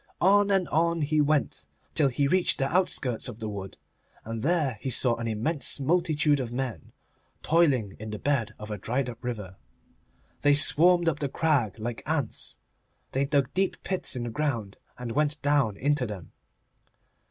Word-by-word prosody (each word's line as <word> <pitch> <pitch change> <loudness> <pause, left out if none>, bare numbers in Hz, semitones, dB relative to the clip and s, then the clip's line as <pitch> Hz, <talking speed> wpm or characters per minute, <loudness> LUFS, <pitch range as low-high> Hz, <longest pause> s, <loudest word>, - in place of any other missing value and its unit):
On 205 +2 +4
and 190 -3 +2
on 170 +1 +1
he 150 +1 +2
went, 150 -1 0 0.3
till 145 - +3
he 135 +2 0
reached 185 +4 +2
the 135 - 0
outskirts 135 -10 0
of 120 -4 -8
the 110 - -5
wood, 100 -2 -7 0.5
and 115 0 -5
there 145 -6 0
he 135 - -3
saw 125 -1 +3
an 115 0 -4
immense 130 +9 0
multitude 155 -1 +2
of 125 -3 -4
men 120 - -5 0.5
toiling 140 - +2
in 110 +1 -7
the 105 - -5
bed 135 -3 -1
of 105 0 -8
a 105 - -4
dried 125 +5 -1
up 115 - -15
river. 105 -7 -5 0.8
They 145 0 +5
swarmed 170 +4 +6
up 155 -2 +1
the 140 -1 -2
crag 140 - 0
like 115 +1 -5
ants. 145 -6 -2 0.5
They 135 +1 0
dug 140 -2 0
deep 190 +1 -1
pits 185 -6 -2
in 125 - -3
the 120 - -4
ground 115 -7 -2 0.2
and 125 -2 -5
went 150 +3 0
down 140 -8 +2
into 145 -2 0
them. 100 -5 -8
140 Hz, 175 wpm, -27 LUFS, 115-155 Hz, 0.8 s, swarmed